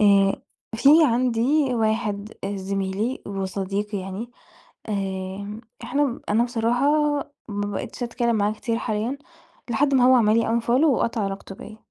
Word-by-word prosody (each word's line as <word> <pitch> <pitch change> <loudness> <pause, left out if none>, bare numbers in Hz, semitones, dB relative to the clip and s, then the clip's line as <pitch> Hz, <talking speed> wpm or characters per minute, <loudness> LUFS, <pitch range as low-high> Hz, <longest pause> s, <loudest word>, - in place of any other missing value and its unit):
آآ، 200 -1 +4 0.3
في 240 +5 +3 0.2
عندي 250 +3 +2
واحد 215 -2 -1
آآ 200 +1 -3
زميلي 195 +5 -2
وصديقي 195 +1 -3
يعني، 195 +5 -6 0.6
آآ، 195 +1 -4 0.2
إحنا 260 +1 0
أنا 220 +3 +3
بصراحة 240 +2 +1 0.6
ما 205 -2 -3
بقِيتِش 245 - -5
أتكلَّم 235 -1 0
معاه 205 0 +1
كتير 225 +2 -2
حاليًا، 220 +5 -2 0.5
لحد 275 +4 +2
ما 255 -2 +5
هو 255 +1 +7
عمَل 220 -2 +4
لي 230 +1 +1
unfollow 230 - -8
وقطَع 240 -6 +2
علاقته 195 0 -5
بيّا. 215 +3 -11
220 Hz, 135 wpm, -24 LUFS, 200-240 Hz, 0.6 s, هو